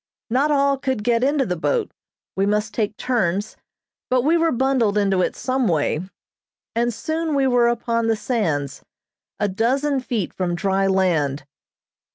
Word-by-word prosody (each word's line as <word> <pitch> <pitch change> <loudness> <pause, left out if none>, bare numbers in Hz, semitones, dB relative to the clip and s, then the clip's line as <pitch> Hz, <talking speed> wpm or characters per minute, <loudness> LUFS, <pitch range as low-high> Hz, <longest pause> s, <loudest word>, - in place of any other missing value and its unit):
Not 270 +5 +2
all 280 -2 +2
could 260 -6 -2
get 235 +1 +2
into 280 0 +2
the 180 - -2
boat; 445 - -1 0.4
we 195 +1 +1
must 210 0 0
take 210 -2 -2
turns, 205 -4 -1 0.5
but 255 -1 +2
we 315 +5 +3
were 330 -1 +2
bundled 245 -5 +1
into 195 -2 +2
it - - -1
some 255 -1 0
way, 155 -3 +1 0.8
and 240 +1 +1
soon 315 +5 -2
we 275 -1 +2
were 245 -2 +3
upon 230 -1 0
the 225 - +2
sands, 165 - -2 0.6
a 205 - +1
dozen 265 +8 0
feet 235 -7 -3
from 175 -2 -2
dry 195 +1 +1
land. 165 -8 +1
230 Hz, 160 wpm, -22 LUFS, 195-265 Hz, 0.8 s, we